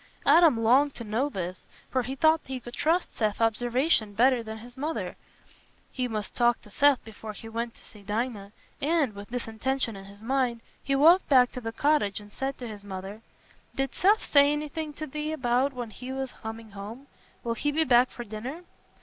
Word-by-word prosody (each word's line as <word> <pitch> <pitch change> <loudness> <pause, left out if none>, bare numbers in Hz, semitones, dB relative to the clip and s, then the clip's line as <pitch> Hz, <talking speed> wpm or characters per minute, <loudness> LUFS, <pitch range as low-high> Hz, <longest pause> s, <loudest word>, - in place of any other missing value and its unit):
Adam 330 -9 +6
longed 260 +5 +4
to 235 - -6
know 230 +6 0
this, 185 -6 -5 0.2
for 260 - +2
he 255 +3 -4
thought 315 +2 +4
he 260 -1 -4
could 240 0 -10
trust 330 +6 +1
Seth's 215 -2 0
observation 230 0 +2
better 250 +2 +4
than 220 -1 -7
his 240 +2 -12
mother's. 300 +4 -3 0.8
He 255 -2 -2
must 215 -3 -4
talk 240 -1 +3
to 210 - -15
Seth 285 +3 +4
before 220 0 -8
he 225 - -10
went 230 +1 -4
to - - -16
see 210 - -15
Dinah, 210 -1 -3 0.3
and, 295 -5 +2
with 200 0 -10
this 245 -1 -4
intention 230 +1 -2
in 195 0 -10
his 200 +2 -14
mind, 245 -2 0 0.2
he 275 - 0
walked 330 +7 +6
back 255 -3 +6
to 250 - -6
the 225 -1 -4
cottage 280 -6 +1
and 205 0 -14
said 270 +4 -3
to 245 - -6
his 210 -2 -9
mother, 195 +2 -7 0.5
"Did 270 -1 -1
Seth 415 +4 +3
say 285 0 +6
anything 300 +1 -3
to 310 +2 -5
thee 300 +2 -4
about 255 -1 +1
when 245 -4 -6
he 250 +5 -8
was 265 -1 -3
coming 225 0 -8
home? 210 +7 -8 0.4
Will 235 - -1
he 290 +5 -1
be 320 +2 +2
back 250 -2 +5
to 240 - -5
dinner?" 240 - -7
245 Hz, 200 wpm, -27 LUFS, 220-280 Hz, 0.8 s, Adam